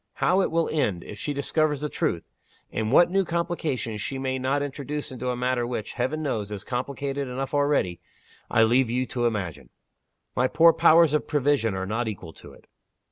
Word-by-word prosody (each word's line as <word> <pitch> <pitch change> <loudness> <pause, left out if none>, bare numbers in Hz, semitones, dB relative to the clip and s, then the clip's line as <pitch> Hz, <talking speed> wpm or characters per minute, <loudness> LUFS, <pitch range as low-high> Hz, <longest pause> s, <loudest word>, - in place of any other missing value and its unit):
How 185 +2 +2
it - - +1
will 165 0 +1
end, 110 - 0
if 105 - -9
she 145 - -2
discovers 150 +1 0
the 150 - -1
truth 85 - -1 0.5
and 110 0 -2
what 175 +5 +6
new 195 +1 +3
complications 165 - -2
she 135 - -3
may 130 0 -2
not 135 +3 0
introduce 145 +1 -5
into 125 0 -4
a 125 - -1
matter 125 -1 0
which, 120 -3 -4
Heaven 140 +6 -2
knows, 110 -8 -2
is 100 -2 -5
complicated 135 +2 -3
enough 130 +2 -4
already 145 - +1 0.5
I 115 -2 +4
leave 120 +2 +3
you 125 +2 0
to 120 -1 0
imagine. 85 - -4 0.7
My 125 - +3
poor 165 +4 +6
powers 165 -1 +5
of 150 - 0
prevision 140 -7 +1
are 95 0 -2
not 110 +4 -2
equal 95 -6 -6
to - - -13
it." - - -18
130 Hz, 190 wpm, -25 LUFS, 115-150 Hz, 0.7 s, what